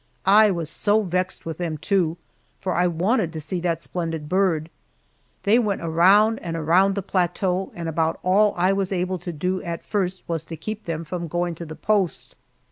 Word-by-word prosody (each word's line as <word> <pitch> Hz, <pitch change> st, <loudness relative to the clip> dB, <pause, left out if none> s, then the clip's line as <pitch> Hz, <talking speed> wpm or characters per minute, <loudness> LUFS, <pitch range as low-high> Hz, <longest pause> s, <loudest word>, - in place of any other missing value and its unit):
I 210 Hz, +2 st, +7 dB
was 170 Hz, -5 st, -2 dB
so 210 Hz, +7 st, +2 dB
vexed 185 Hz, 0 st, -2 dB
with 165 Hz, 0 st, -5 dB
them, 165 Hz, -3 st, -2 dB
too, 170 Hz, 0 st, 0 dB, 0.4 s
for 185 Hz, -, -2 dB
I 180 Hz, +1 st, +2 dB
wanted 180 Hz, +2 st, +1 dB
to 160 Hz, -, -4 dB
see 175 Hz, +4 st, -3 dB
that 170 Hz, -2 st, -1 dB
splendid 165 Hz, +1 st, -4 dB
bird. 170 Hz, -3 st, +1 dB, 0.7 s
They 220 Hz, +4 st, +4 dB
went 210 Hz, -4 st, -1 dB
around 195 Hz, +7 st, +4 dB
and 165 Hz, -2 st, -4 dB
around 180 Hz, +5 st, +3 dB
the 200 Hz, -, -2 dB
plateau, 185 Hz, 0 st, 0 dB
and 170 Hz, -1 st, -5 dB
about 160 Hz, 0 st, 0 dB
all 200 Hz, +3 st, +3 dB
I 185 Hz, +2 st, +3 dB
was 195 Hz, -1 st, -1 dB
able 185 Hz, 0 st, -1 dB
to 175 Hz, -, -5 dB
do 180 Hz, +4 st, -2 dB
at 170 Hz, -1 st, -5 dB
first 190 Hz, -3 st, -1 dB
was 165 Hz, -2 st, -2 dB
to 165 Hz, 0 st, -7 dB
keep 215 Hz, +6 st, -6 dB
them 165 Hz, -1 st, -3 dB
from 170 Hz, +2 st, -5 dB
going 175 Hz, +2 st, -1 dB
to 165 Hz, +1 st, -8 dB
the 155 Hz, -, -7 dB
post. 200 Hz, -3 st, -1 dB
180 Hz, 195 wpm, -23 LUFS, 165-195 Hz, 0.7 s, I